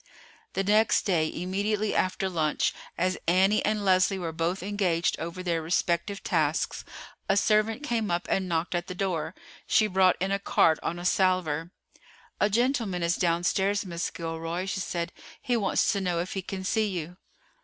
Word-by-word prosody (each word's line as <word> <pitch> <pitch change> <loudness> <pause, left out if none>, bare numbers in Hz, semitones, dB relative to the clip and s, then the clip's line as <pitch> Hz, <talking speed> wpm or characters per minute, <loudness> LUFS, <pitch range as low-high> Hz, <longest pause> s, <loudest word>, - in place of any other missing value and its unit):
The 195 - 0
next 210 +2 +3
day, 165 -5 +1
immediately 205 +4 -1
after 185 +1 0
lunch, 160 -5 0 0.2
as 185 +1 0
Annie 190 +4 +4
and 210 -1 0
Leslie 185 +1 +3
were 170 -3 -3
both 170 +3 -2
engaged 190 -4 0
over 170 +3 -5
their 170 -2 0
respective 170 +4 -1
tasks, 155 -3 0 0.5
a 195 - +3
servant 215 +5 +2
came 230 -6 -1
up 175 0 -1
and 190 -1 0
knocked 165 +2 -1
at 175 0 -2
the 180 - -6
door. 175 -2 -2 0.3
She 215 - +4
brought 190 -2 +3
in 190 +1 -1
a 200 - +1
card 160 -4 +3
on 170 - -3
a 175 - -7
salver. 180 -4 +1 0.7
"A 210 - +3
gentleman 230 -5 0
is 170 +1 +2
downstairs, 190 +4 +1
Miss 170 -2 -3
Gilroy," 165 +2 -4
she 195 0 -3
said. 170 -1 -3 0.3
"He 245 - -1
wants 210 -4 +2
to 200 - -1
know 180 -2 0
if 175 +2 -3
he 195 - -2
can 190 +1 -6
see 215 +3 +1
you?" 180 -2 -5
185 Hz, 175 wpm, -27 LUFS, 170-200 Hz, 0.7 s, Annie